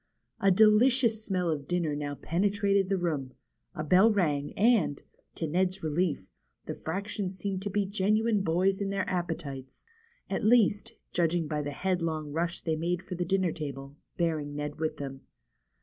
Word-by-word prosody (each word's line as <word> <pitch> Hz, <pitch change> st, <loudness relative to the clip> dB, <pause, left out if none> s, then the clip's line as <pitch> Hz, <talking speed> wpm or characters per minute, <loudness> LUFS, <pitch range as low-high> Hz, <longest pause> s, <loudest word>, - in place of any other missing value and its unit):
A 195 Hz, -, +4 dB
delicious 220 Hz, +3 st, +4 dB
smell 180 Hz, -5 st, 0 dB
of 145 Hz, -3 st, -4 dB
dinner 170 Hz, -4 st, 0 dB
now 145 Hz, -1 st, -3 dB
penetrated 200 Hz, +4 st, +1 dB
the 195 Hz, -, +2 dB
room, 150 Hz, -7 st, -2 dB, 0.4 s
a 155 Hz, -, -3 dB
bell 185 Hz, +8 st, +5 dB
rang, 150 Hz, -8 st, 0 dB
and, 210 Hz, -, +3 dB, 0.4 s
to 165 Hz, -, -2 dB
Ned's 185 Hz, +4 st, 0 dB
relief, 155 Hz, -, 0 dB, 0.4 s
the -, -, -4 dB
fractions 195 Hz, +2 st, -4 dB
seemed 190 Hz, 0 st, -3 dB
to 205 Hz, -, -3 dB
be 205 Hz, 0 st, 0 dB
genuine 210 Hz, +2 st, +1 dB
boys 190 Hz, +3 st, +1 dB
in 200 Hz, -, -1 dB
their 195 Hz, 0 st, -1 dB
appetites, 160 Hz, -7 st, -4 dB, 0.4 s
at -, -, -2 dB
least, 215 Hz, -2 st, +3 dB, 0.2 s
judging 170 Hz, -1 st, +1 dB
by 150 Hz, -1 st, -1 dB
the 145 Hz, -, -3 dB
headlong 160 Hz, -2 st, -2 dB
rush 170 Hz, +3 st, -2 dB
they 160 Hz, -2 st, -1 dB
made 175 Hz, +3 st, -2 dB
for 185 Hz, -, -7 dB
the 175 Hz, 0 st, -2 dB
dinner 190 Hz, -1 st, +1 dB
table, 140 Hz, -3 st, -6 dB, 0.2 s
bearing 155 Hz, -4 st, -1 dB
Ned 150 Hz, 0 st, -4 dB
with 160 Hz, -1 st, -2 dB
them. 135 Hz, -1 st, -6 dB
175 Hz, 165 wpm, -29 LUFS, 155-195 Hz, 0.4 s, bell